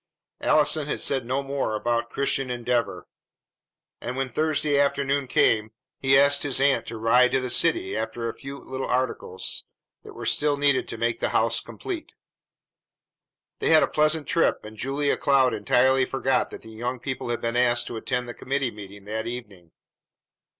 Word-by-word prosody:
Allison 150 0 +3
had - - -2
said 130 -4 +1
no 135 +2 -1
more 135 -5 -2
about 120 +1 -1
Christian 135 -1 0
Endeavor; 120 -6 -2 0.9
and, 125 +1 -5
when 135 -1 -2
Thursday 155 -1 +1
afternoon 140 -1 +1
came, 110 -3 +2 0.3
he 135 0 +4
asked 140 +1 +4
his 140 -3 +2
aunt 140 0 +2
to 115 - -5
ride 125 +3 +4
to - - +3
the 130 -1 -3
city 160 - +2
after 110 +1 -3
a 115 - -3
few 135 +1 -9
little 130 -1 -6
articles 125 -7 -2 0.4
that - - -12
were - - -7
still 145 -1 +2
needed 140 -2 +2
to 115 - -6
make 115 0 -1
the - - 0
house 115 +1 +2
complete. 345 - -7 1.5
They - - 0
had 160 -1 +6
a - - +2
pleasant 155 0 +1
trip, 165 - +1
and 110 +1 -10
Julia 140 +5 -1
Cloud 135 -2 +3
entirely 130 0 +3
forgot 135 0 0
that - - -10
the 110 - -12
young 120 +3 -4
people 130 0 -5
had 120 - -1
been 115 0 -2
asked 120 -1 +2
to - - -6
attend 125 +2 -3
the 120 - -6
committee 135 +1 -2
meeting 100 -1 -11
that 110 +2 -4
evening. 105 -8 -8
130 Hz, 175 wpm, -25 LUFS, 115-140 Hz, 1.5 s, had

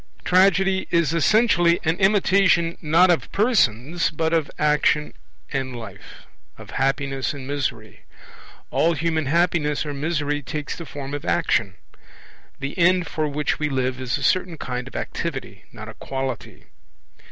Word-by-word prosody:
Tragedy 190 +1 +3
is 170 -3 +2
essentially 175 -1 +3
an 160 0 +1
imitation 190 -4 +3
not 170 +4 +4
of 170 - -1
persons 170 - +1
but 160 +1 -1
of 160 -3 +1
action 150 0 +2 0.4
and 130 -2 -2
life, 110 -5 -11 0.3
of - - -12
happiness 135 0 -1
and 135 -2 -8
misery. 130 -6 -4 0.7
All 170 +1 +2
human 160 -2 -1
happiness 160 -2 +1
or 145 - -4
misery 150 0 -1
takes 145 +3 -5
the 170 - -9
form 140 -1 -7
of 145 - -4
action; 100 -4 0 0.8
the 140 +1 -5
end 180 +1 +4
for 155 0 -2
which 150 0 -1
we 150 -1 0
live 130 -1 -1
is 125 -2 -1
a - - -6
certain 180 -3 +1
kind 125 -2 -5
of - - -12
activity, - - -5
not - - -10
a - - -8
quality. 135 -3 -5
150 Hz, 145 wpm, -23 LUFS, 135-170 Hz, 0.8 s, not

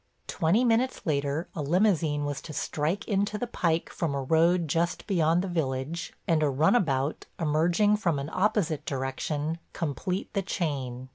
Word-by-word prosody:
Twenty 180 +10 +2
minutes 245 +2 +2
later 145 +1 0
a 155 - -4
limousine 160 -2 +2
was 145 -1 -3
to 155 - -8
strike 160 +9 -2
into 205 +1 0
the 245 - -2
pike 170 -8 -1
from 155 -5 -2
a 140 - -2
road 165 +4 +3
just 165 +3 0
beyond 170 -3 +2
the - - -3
village, 155 -1 -2 0.2
and 160 -2 +3
a 150 - +3
runabout, 145 - +1
emerging 170 +7 +3
from 170 -8 0
an 140 +3 -4
opposite 190 -6 +1
direction, 145 +4 -2
complete 175 +5 -3
the 200 - +1
chain. 135 -9 -3
160 Hz, 155 wpm, -28 LUFS, 145-185 Hz, 0.2 s, road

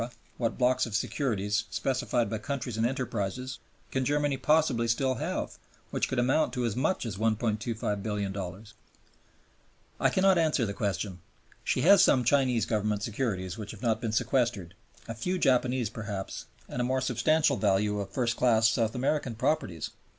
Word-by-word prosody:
what 115 -2 -1
blocks 125 -1 +2
of 110 - -4
securities, 105 -4 0
specified 125 -3 0
by 110 - -3
countries 130 -1 -4
and 110 +1 +2
enterprises, 125 -1 -3 0.3
can 130 - 0
Germany 145 +1 +1
possibly 145 -6 +2
still 130 +3 +1
have - - -3 0.3
which - - 0
could 130 - -2
amount 130 +6 +2
to 125 -1 -1
as 110 -3 -1
much 140 +4 0
as 105 -5 -4
$1,250,000,000? 105 -3 -2 1.3
I - - +4
cannot 190 -1 +4
answer 155 -7 +2
the 100 - -3
question. 95 -2 -2 0.4
She - - 0
has 195 +3 +7
some 130 -8 +4
Chinese 125 -2 +2
Government 105 -2 -1
securities 105 -5 -2
which 105 -1 -6
have 110 +1 -9
not 115 -1 +1
been 115 -3 -2
sequestered, 115 -7 0 0.3
a 115 - -4
few 180 +12 -2
Japanese 125 - +2
perhaps, 105 -4 -5 0.2
and 125 - -3
a - - +1
more 130 +2 +1
substantial 155 +1 +2
value 105 0 +1
of 100 -1 -4
first 120 +2 0
class 115 -3 +4
South 115 0 +1
American 130 -1 0
properties. 95 - -1
115 Hz, 160 wpm, -29 LUFS, 105-130 Hz, 1.3 s, has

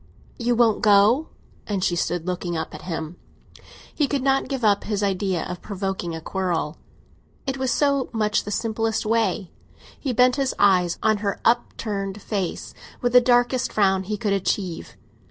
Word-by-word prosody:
"You 240 0 +1
won't 230 -2 +3
go?" 210 +8 +5 0.4
And 200 -3 -1
she 175 - +1
stood 175 -1 -1
looking 180 -2 -2
up 160 - -4
at - - -8
him. 165 -1 -5 0.8
He 295 - +1
could 275 -2 -1
not 270 0 +2
give 265 -4 -2
up 200 -1 +3
his 210 -1 -1
idea 190 -2 0
of 180 - -6
provoking 190 -4 -4
a - - -5
quarrel; 175 -4 -2 0.7
it 270 -1 -3
was 260 -1 0
so 280 -3 +1
much 215 -2 +1
the - - -6
simplest 225 +1 -1
way! 215 -4 0 0.5
He 270 - -2
bent 250 +3 +4
his 270 -2 0
eyes 185 -4 +3
on 215 -1 +3
her 200 -1 -2
upturned 210 -4 0
face, 195 -3 -4 0.3
with 245 -1 -1
the 250 - +8
darkest 245 +1 +2
frown 190 -2 +2
he 210 +2 -3
could 205 -2 0
achieve. 185 - -2
210 Hz, 170 wpm, -23 LUFS, 190-240 Hz, 0.8 s, the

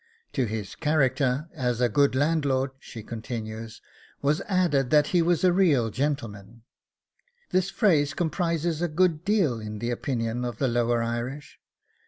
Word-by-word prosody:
'To 130 - +1
his 105 -2 -5
character 145 -2 +1
as 125 -6 -1
a 125 - +3
good 140 +1 +2
landlord,' 140 -2 +1
she 110 -4 -10
continues, 110 -1 -6 0.4
'was 145 +2 +2
added 170 -9 +2
that 150 +1 +4
he 175 - +5
was 170 +1 +1
a 180 -1 +5
real 145 - +3
gentleman; 115 -6 -4 0.9
this 185 +1 +1
phrase 150 -10 +2
comprises 165 -1 -1
a 175 - +1
good 165 0 +1
deal 190 - +1
in 105 0 -6
the 120 +3 -2
opinion 120 -1 -2
of 120 -1 -4
the 135 - +1
lower 120 -1 +1
Irish. 120 +5 -5
135 Hz, 150 wpm, -26 LUFS, 120-160 Hz, 0.9 s, he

